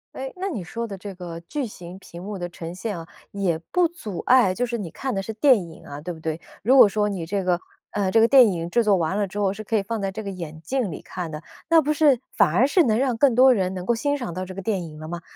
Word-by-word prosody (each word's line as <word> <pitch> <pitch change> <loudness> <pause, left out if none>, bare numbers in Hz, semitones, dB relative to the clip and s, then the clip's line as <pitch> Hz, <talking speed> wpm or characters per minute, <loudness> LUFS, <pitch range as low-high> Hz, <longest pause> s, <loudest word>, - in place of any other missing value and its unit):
哎， 265 0 -5
那 385 +2 -3
你 225 - -4
说 230 +7 -5
的 200 -3 -7
这 195 +1 -8
个 175 -2 -7
巨 270 - -4
型 180 -4 -10
屏 175 -2 -11
幕 200 +1 -5
的 175 -1 -4
呈 170 0 -8
现 205 -1 -4
啊， 165 - -9 0.2
也 190 -5 0
不 360 -2 +3
阻 220 - -8
碍 245 -7 +5
就 245 +6 -1
是 240 -1 -3
你 190 -7 -6
看 265 -4 -3
的 195 - -1
是 220 - -5
电 255 +2 +5
影 160 - -14
啊， 145 +1 -8
对 175 +3 -5
不 160 - -12
对？ 160 +1 -4 0.2
如 250 +6 +4
果 240 -6 +9
说 210 +1 0
你 190 -5 -3
这 195 +2 -2
个 180 -1 +2 0.3
呃， 195 -2 0
这 225 - +5
个 225 - +6
电 250 -4 +7
影 170 -1 -3
制 235 +5 +2
作 205 -3 +4
完 175 +4 -1
了 205 - +1
之 200 +2 -6
后 195 -2 +1
是 215 +2 -8
可 220 +1 0
以 200 - 0
放 225 +1 -3
在 195 -1 -1
这 220 - -6
个 200 - -5
眼 165 -4 -7
镜 240 - -1
里 155 - -7
看 175 -3 -6
的， 150 - -6 0.3
那 330 -1 +6
不 300 +1 0
是 295 -6 +4 0.2
反 195 -7 +4
而 245 +10 +4
是 345 +4 +4
能 220 -2 +2
让 260 -3 +1
更 260 +1 +4
多 260 +1 +7
人 190 -4 0
能 180 -1 -5
够 235 - +2
欣 285 +5 0
赏 240 -10 -5
到 185 +1 -4
这 185 - -7
个 195 - -6
电 195 -4 -1
影 155 -1 -10
了 155 - -7
吗？ 170 0 -5
200 Hz, 320 characters per minute, -24 LUFS, 175-240 Hz, 0.3 s, 果